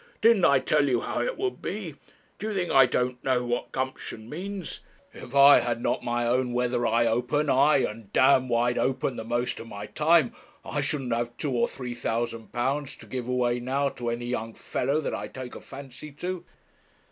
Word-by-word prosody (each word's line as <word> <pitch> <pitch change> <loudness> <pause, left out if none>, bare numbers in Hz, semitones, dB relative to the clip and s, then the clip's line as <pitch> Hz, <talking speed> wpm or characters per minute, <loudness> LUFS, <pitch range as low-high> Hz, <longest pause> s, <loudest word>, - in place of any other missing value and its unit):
didn't 225 -5 +5
I 140 - +6
tell 135 +2 +2
you 120 -2 +2
how - - -2
it - - -2
would 390 -1 -2
be? 190 -5 -4 0.5
Do 215 - -3
you 215 - -3
think 180 -3 -1
I 135 -1 +7
don't 125 0 -1
know 125 -2 +1
what 120 0 -2
gumption 130 -4 -4
means? 185 +5 -6 0.3
If 125 +2 -10
I 140 +1 +9
had 120 -1 -1
not - - 0
had - - -14
my 120 0 0
own 125 +1 +1
weather 120 -1 +1
eye 115 +1 +3
open, 125 +6 +1
aye, 140 +1 +4
and 105 -2 -10
d - - +1
wide 125 -2 +3
open, 130 -1 0
the 110 - -5
most 120 +2 -1
of 115 - -8
my 105 -1 -7
time, 150 +1 +3 0.3
I - - -2
shouldn't 135 -5 -1
have 120 0 -2
two 145 - -2
or 120 -2 +2
three 125 -2 -6
thousand 115 -1 -3
pounds 135 +3 -1
to - - -14
give 125 -2 -5
away 125 -1 +1
now 135 +3 0
to 120 -3 -4
any 120 +1 -3
young 115 -2 -3
fellow 140 +5 -1
that - - -3
I - - -4
take 130 -2 -8
a - - -9
fancy 140 +2 -10
to.' 175 +4 -5
125 Hz, 205 wpm, -27 LUFS, 120-140 Hz, 0.5 s, I